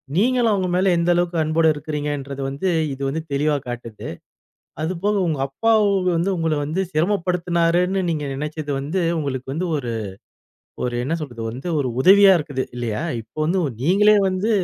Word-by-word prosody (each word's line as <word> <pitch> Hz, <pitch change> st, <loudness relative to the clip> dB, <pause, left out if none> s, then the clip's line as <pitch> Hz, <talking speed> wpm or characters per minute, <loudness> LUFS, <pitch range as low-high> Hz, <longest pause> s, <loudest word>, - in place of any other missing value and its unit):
நீங்களும் 235 Hz, +3 st, +3 dB
அவங்க 190 Hz, -2 st, 0 dB
மேல 185 Hz, +1 st, +3 dB
எந்த 170 Hz, +1 st, +1 dB
அளவுக்கு 175 Hz, -1 st, 0 dB
அன்போட 155 Hz, +1 st, +1 dB
இருக்கிறீங்கன்றத 145 Hz, -2 st, -4 dB
வந்து 140 Hz, +7 st, -3 dB, 0.3 s
இது 135 Hz, -, -9 dB
வந்து 160 Hz, +3 st, -2 dB
தெளிவா 150 Hz, +2 st, +1 dB
காட்டுது. 120 Hz, -3 st, -7 dB, 0.7 s
அது 175 Hz, +4 st, -1 dB
போக 210 Hz, +1 st, +2 dB
உங்க 155 Hz, -4 st, -1 dB
அப்பா 225 Hz, +12 st, 0 dB, 0.4 s
வந்து 175 Hz, +4 st, +1 dB
உங்களை 160 Hz, -1 st, 0 dB
வந்து 160 Hz, +6 st, -1 dB
சிரமப்படுத்தினாருன்னு 175 Hz, +1 st, +1 dB
நீங்க 150 Hz, -3 st, -2 dB
நினைச்சது 150 Hz, +1 st, -4 dB
வந்து 155 Hz, +7 st, -2 dB, 0.2 s
உங்களுக்கு 130 Hz, -2 st, -4 dB
வந்து 175 Hz, +5 st, -2 dB
ஒரு 125 Hz, -4 st, -4 dB, 0.9 s
ஒரு 120 Hz, -1 st, -2 dB
என்ன 145 Hz, -, -2 dB
சொல்றது? 120 Hz, -6 st, -6 dB
வந்து 130 Hz, +9 st, -6 dB
ஒரு 130 Hz, -, -1 dB
உதவியா 195 Hz, +4 st, +7 dB
இருக்குது 140 Hz, -4 st, -3 dB
இல்லையா? 115 Hz, -3 st, -2 dB, 0.2 s
இப்ப 115 Hz, +7 st, -31 dB
வந்து 185 Hz, +3 st, +1 dB, 0.2 s
நீங்களே 210 Hz, +6 st, +5 dB
வந்து 190 Hz, +4 st, -1 dB
160 Hz, 155 wpm, -21 LUFS, 140-185 Hz, 0.9 s, உதவியா